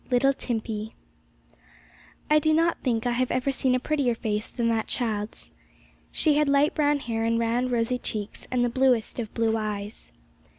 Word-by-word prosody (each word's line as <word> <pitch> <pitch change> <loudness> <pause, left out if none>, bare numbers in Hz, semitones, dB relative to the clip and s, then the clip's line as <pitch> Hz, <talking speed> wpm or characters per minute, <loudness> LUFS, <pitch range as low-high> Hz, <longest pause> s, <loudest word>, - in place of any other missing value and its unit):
LITTLE 265 +2 +3
TIMPEY. 220 -3 -4 1.3
I 305 0 +5
do 310 0 +2
not 335 +1 +2
think 235 -3 0
I 245 - +1
have 250 +1 0
ever 255 +2 0
seen 260 -1 +1
a - - +1
prettier 270 -4 0
face 215 -2 -2
than 235 -2 -2
that 225 -1 0
child's. 215 -3 -3 0.6
She 310 - +3
had 300 -1 +2
light 280 +2 +3
brown 295 -1 +2
hair, 225 -2 -2
and 230 0 +1
round 235 +2 0
rosy 245 +1 0
cheeks, 210 -3 -5
and 250 -1 +1
the - - +1
bluest 250 -2 +1
of 220 -2 -4
blue 225 -1 +1
eyes. 210 - -5
240 Hz, 175 wpm, -26 LUFS, 225-265 Hz, 1.3 s, I